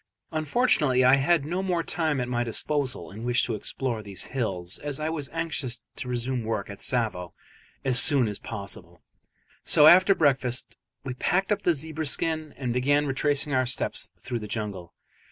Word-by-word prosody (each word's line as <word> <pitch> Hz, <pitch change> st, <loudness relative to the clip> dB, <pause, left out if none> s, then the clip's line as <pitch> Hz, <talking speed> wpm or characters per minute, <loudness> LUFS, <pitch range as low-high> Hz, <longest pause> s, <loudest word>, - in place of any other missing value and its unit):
Unfortunately 155 Hz, -, +2 dB
I 130 Hz, +2 st, +6 dB
had 140 Hz, +2 st, +2 dB
no 175 Hz, +5 st, -2 dB
more 180 Hz, -3 st, 0 dB
time 160 Hz, -5 st, 0 dB
at 125 Hz, -, -2 dB
my 120 Hz, -1 st, 0 dB
disposal 130 Hz, +2 st, -2 dB
in 110 Hz, +4 st, -9 dB
which 125 Hz, +1 st, +2 dB
to 120 Hz, -, -1 dB
explore 115 Hz, +2 st, -3 dB
these 100 Hz, -2 st, -5 dB
hills, 95 Hz, -8 st, -3 dB
as 145 Hz, -1 st, -4 dB
I 155 Hz, +1 st, -1 dB
was 150 Hz, -4 st, -4 dB
anxious 160 Hz, -7 st, -3 dB
to -, -, -5 dB
resume 125 Hz, 0 st, -1 dB
work 110 Hz, -2 st, -3 dB
at 100 Hz, -, -10 dB
Tsavo 110 Hz, -8 st, -1 dB, 0.5 s
as 125 Hz, -2 st, +6 dB
soon 140 Hz, -6 st, +4 dB
as 105 Hz, -1 st, -5 dB
possible; 100 Hz, -4 st, -8 dB, 0.6 s
so 150 Hz, -, +5 dB
after 185 Hz, +5 st, +7 dB
breakfast 130 Hz, -5 st, +1 dB, 0.3 s
we 130 Hz, -2 st, -4 dB
packed 190 Hz, +10 st, 0 dB
up 205 Hz, -1 st, +1 dB
the 175 Hz, -4 st, +2 dB
zebra 155 Hz, +1 st, -4 dB
skin 155 Hz, +1 st, -1 dB
and 125 Hz, -3 st, -2 dB
began 145 Hz, +4 st, +2 dB
to 145 Hz, -, -3 dB
retrace 145 Hz, +1 st, +1 dB
our 130 Hz, -3 st, 0 dB
steps 125 Hz, -, -2 dB
through 120 Hz, -, -4 dB
the 105 Hz, -, -7 dB
jungle. 105 Hz, -5 st, -5 dB
130 Hz, 180 wpm, -26 LUFS, 120-155 Hz, 0.6 s, after